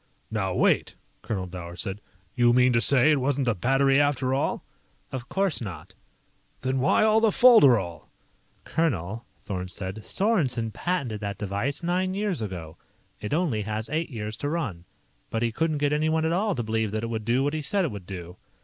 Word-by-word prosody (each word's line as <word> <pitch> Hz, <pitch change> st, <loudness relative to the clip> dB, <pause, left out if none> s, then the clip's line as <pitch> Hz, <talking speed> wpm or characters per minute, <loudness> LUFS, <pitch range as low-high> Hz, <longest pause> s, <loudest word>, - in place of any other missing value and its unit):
"Now 95 Hz, -4 st, -1 dB
wait -, -, +2 dB
" -, -, -40 dB
Colonel 95 Hz, -4 st, -3 dB
Dower 90 Hz, -1 st, -8 dB
said. 95 Hz, +4 st, -4 dB, 0.3 s
"You 120 Hz, -1 st, +4 dB
mean 125 Hz, 0 st, +4 dB
to 115 Hz, -, +3 dB
say 140 Hz, +4 st, +6 dB
it 150 Hz, -, +3 dB
wasn't 135 Hz, 0 st, 0 dB
a 115 Hz, -, +3 dB
battery 135 Hz, +7 st, +3 dB
after 135 Hz, -3 st, +1 dB
all?" 135 Hz, -, -1 dB, 0.5 s
"Of 130 Hz, -1 st, -6 dB
course 195 Hz, -7 st, 0 dB
not." 100 Hz, -6 st, -7 dB, 0.7 s
"Then 130 Hz, 0 st, -1 dB
why 135 Hz, +10 st, +3 dB
all 220 Hz, 0 st, +4 dB
the 225 Hz, -, +4 dB
folderol?" 130 Hz, -, +5 dB, 0.6 s
"Colonel," 115 Hz, -, -1 dB, 0.2 s
Thorn 90 Hz, -2 st, -4 dB
said, 95 Hz, +3 st, -6 dB
"Sorensen 135 Hz, -, 0 dB
patented 125 Hz, -, -2 dB
that 100 Hz, -2 st, -4 dB
device 105 Hz, -, -3 dB
nine 185 Hz, +2 st, 0 dB
years 200 Hz, -, -1 dB
ago. 90 Hz, -6 st, -6 dB, 0.4 s
It 105 Hz, -, -5 dB
only 150 Hz, -9 st, 0 dB
has 110 Hz, +1 st, -4 dB
eight 160 Hz, +2 st, -1 dB
years 110 Hz, -4 st, -5 dB
to 145 Hz, -, -3 dB
run. 115 Hz, -, -3 dB, 0.4 s
But 115 Hz, +1 st, -1 dB
he 115 Hz, -, +1 dB
couldn't 155 Hz, +5 st, 0 dB
get 145 Hz, 0 st, +1 dB
anyone 155 Hz, +1 st, +1 dB
at 160 Hz, -, +1 dB
all 200 Hz, +2 st, +1 dB
to 120 Hz, -, -2 dB
believe 110 Hz, 0 st, -1 dB
that 110 Hz, 0 st, -2 dB
it 115 Hz, -, -3 dB
would 110 Hz, -1 st, -3 dB
do 120 Hz, +4 st, +1 dB
what 145 Hz, +1 st, 0 dB
he 155 Hz, -, -2 dB
said 190 Hz, +6 st, 0 dB
it 160 Hz, -, -2 dB
would 100 Hz, -4 st, -9 dB
do. 90 Hz, -2 st, -8 dB
125 Hz, 195 wpm, -26 LUFS, 105-155 Hz, 0.7 s, say